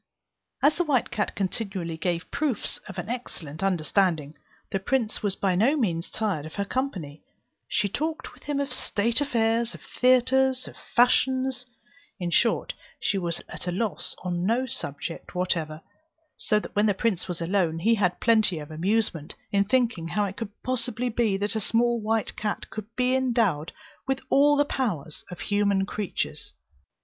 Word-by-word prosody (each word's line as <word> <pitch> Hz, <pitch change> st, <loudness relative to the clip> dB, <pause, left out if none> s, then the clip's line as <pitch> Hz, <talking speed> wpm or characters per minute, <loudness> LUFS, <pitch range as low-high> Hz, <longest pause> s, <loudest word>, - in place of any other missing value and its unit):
As 290 Hz, +2 st, +6 dB
the 350 Hz, -, +1 dB
white 280 Hz, -7 st, +1 dB
cat 210 Hz, -, -1 dB
continually 190 Hz, -4 st, -2 dB
gave 170 Hz, +1 st, -2 dB
proofs 280 Hz, -6 st, -1 dB
of -, -, -8 dB
an -, -, -4 dB
excellent 180 Hz, -, -6 dB
understanding, 175 Hz, -4 st, +1 dB, 0.4 s
the 195 Hz, -, 0 dB
prince 220 Hz, +2 st, 0 dB
was 200 Hz, -2 st, 0 dB
by 195 Hz, -2 st, +1 dB
no 235 Hz, +12 st, +3 dB
means 175 Hz, -, 0 dB
tired 195 Hz, -9 st, -1 dB
of 160 Hz, -, -11 dB
her 200 Hz, -, -1 dB
company; 190 Hz, -, -3 dB, 0.5 s
she 205 Hz, -, +1 dB
talked 315 Hz, -, -3 dB
with -, -, -18 dB
him 290 Hz, -1 st, -1 dB
of 280 Hz, 0 st, -1 dB
state 230 Hz, +5 st, +1 dB
affairs, 230 Hz, -3 st, +1 dB
of -, -, -12 dB
theatres, 255 Hz, +1 st, +3 dB
of -, -, -10 dB, 0.2 s
fashions; 255 Hz, +1 st, +3 dB, 0.5 s
in 175 Hz, -1 st, -2 dB
short, 230 Hz, +6 st, +2 dB, 0.3 s
she 200 Hz, -, +1 dB
was 170 Hz, -2 st, -2 dB
at -, -, -7 dB
a -, -, +1 dB
loss 205 Hz, +3 st, -2 dB
on 175 Hz, -1 st, -1 dB
no 235 Hz, +6 st, +2 dB
subject 165 Hz, -, -5 dB
whatever; 165 Hz, -4 st, -1 dB, 0.5 s
so 210 Hz, -1 st, +2 dB
that -, -, -9 dB
when 205 Hz, +1 st, +4 dB
the 205 Hz, -, +2 dB
prince 195 Hz, -4 st, 0 dB
was 180 Hz, -2 st, -4 dB
alone, 170 Hz, -1 st, +1 dB
he 220 Hz, +8 st, +3 dB
had 180 Hz, -5 st, +1 dB
plenty 220 Hz, -6 st, +4 dB
of 150 Hz, 0 st, -7 dB
amusement 175 Hz, -1 st, 0 dB, 0.2 s
in 200 Hz, 0 st, +4 dB
thinking 230 Hz, -7 st, +1 dB
how 205 Hz, +5 st, +1 dB
it 195 Hz, -1 st, -5 dB
could 225 Hz, -3 st, -4 dB
possibly 245 Hz, -1 st, -1 dB
be 220 Hz, -4 st, +1 dB
that 205 Hz, +2 st, -1 dB
a -, -, +1 dB
small 235 Hz, +2 st, +2 dB
white 220 Hz, +1 st, 0 dB
cat 210 Hz, -1 st, -3 dB
could 215 Hz, -2 st, -6 dB
be 250 Hz, 0 st, +2 dB
endowed 230 Hz, -, +2 dB, 0.4 s
with 270 Hz, 0 st, +1 dB
all 290 Hz, +1 st, +6 dB
the 290 Hz, -, +4 dB
powers 180 Hz, -, -2 dB
of 180 Hz, -, -8 dB
human 200 Hz, -2 st, +2 dB
creatures. 205 Hz, -2 st, -3 dB
210 Hz, 170 wpm, -26 LUFS, 180-245 Hz, 0.5 s, As